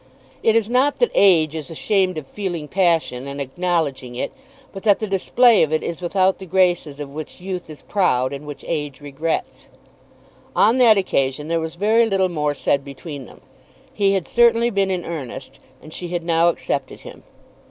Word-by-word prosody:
It 225 - +3
is 225 -2 +2
not 255 +4 +2
that 485 - +2
Age 165 -6 +4
is 155 0 -6
ashamed 185 +1 0
of 155 - -5
feeling 175 -2 -5
passion 165 -8 +1
and 140 +1 -6
acknowledging 140 -4 -2
it, 125 - -3 0.4
but 195 - -7
that 205 -1 +4
the 220 - -3
display 215 +4 +4
of 155 - +2
it 155 - 0
is, 170 +1 -5
without 185 +2 +1
the 190 - -9
graces 175 -5 +1
of 145 - -5
which 155 +4 -8
Youth 180 -2 -6
is 155 - -11
proud, 130 -10 +1
and 140 +2 -8
which 145 -2 -9
Age 145 -4 -3
regrets. 145 +3 -4 0.9
On 230 +5 +4
that 225 -4 +6
occasion 150 -5 -1
there 165 0 +1
was 160 +1 -5
very 220 +5 +3
little 190 -3 +1
more 150 -3 -1
said 140 -1 0
between 140 0 -9
them. - - -16 0.5
He 195 -1 +2
had 190 -3 -1
certainly 235 0 +3
been 195 -2 +1
in 180 -2 -2
earnest, 150 -8 -7 0.2
and 155 - -12
she 180 - -5
had 175 -1 -3
now 165 0 +3
accepted 140 -5 -3
him. - - -12
170 Hz, 185 wpm, -21 LUFS, 150-195 Hz, 0.9 s, that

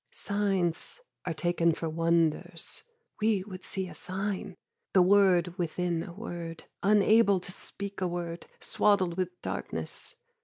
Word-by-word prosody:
Signs 195 - -1 0.2
are 175 - -1
taken 170 0 +2
for 165 - -3
wonders. 165 0 0 0.4
"We 210 -3 +3
would 185 -2 -9
see 190 -1 -2
a - - -9
sign": 190 0 -3 0.4
The 185 - +7
word 180 -3 +4
within 175 0 0
a 170 - -6
word, 170 -4 -6 0.2
unable 205 0 +5
to 180 0 -4
speak 200 +1 -6
a 185 - +2
word, 175 -1 -4
Swaddled 190 -5 +2
with 180 -1 -2
darkness. - - -4
180 Hz, 130 wpm, -30 LUFS, 170-200 Hz, 0.4 s, The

